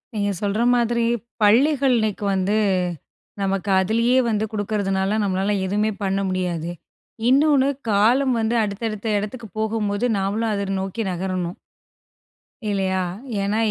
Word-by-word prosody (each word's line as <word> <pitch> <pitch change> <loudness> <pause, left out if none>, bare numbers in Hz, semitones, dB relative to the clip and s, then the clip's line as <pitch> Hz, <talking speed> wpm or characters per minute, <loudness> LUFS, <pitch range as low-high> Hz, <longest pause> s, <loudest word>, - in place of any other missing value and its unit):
நீங்க 205 -1 0
சொல்ற 205 +2 0
மாதிரி 235 -1 +1 0.4
பள்ளிகள் 265 +5 +4
இன்னைக்கு 215 -2 -1
வந்து, 190 +2 +1 0.9
நமக்கு 195 0 -1
அதிலேயே 230 +6 +2
வந்து 215 -1 0
குடுக்குறதனால 205 -1 -1
நம்மளால 195 +1 0
எதுவுமே 210 +3 0
பண்ண 195 0 0
முடியாது. 175 -3 -2 0.6
இன்னொனு 280 0 +4 0.2
காலம் 240 +6 +3
வந்து 225 +1 0
அடுத்த 200 +1 -4
அடுத்த 215 +1 -5
இடத்துக்கு 220 +3 -6
போகும்போது 215 0 -1
நாமளும் 210 +4 -1
அத 200 0 -2
நோக்கி 190 +4 -3
நகரணும். 180 0 -3 1.1
இல்லையா? 190 -2 0 0.4
ஏன்னா 200 +2 0
205 Hz, 120 wpm, -22 LUFS, 195-225 Hz, 1.1 s, பள்ளிகள்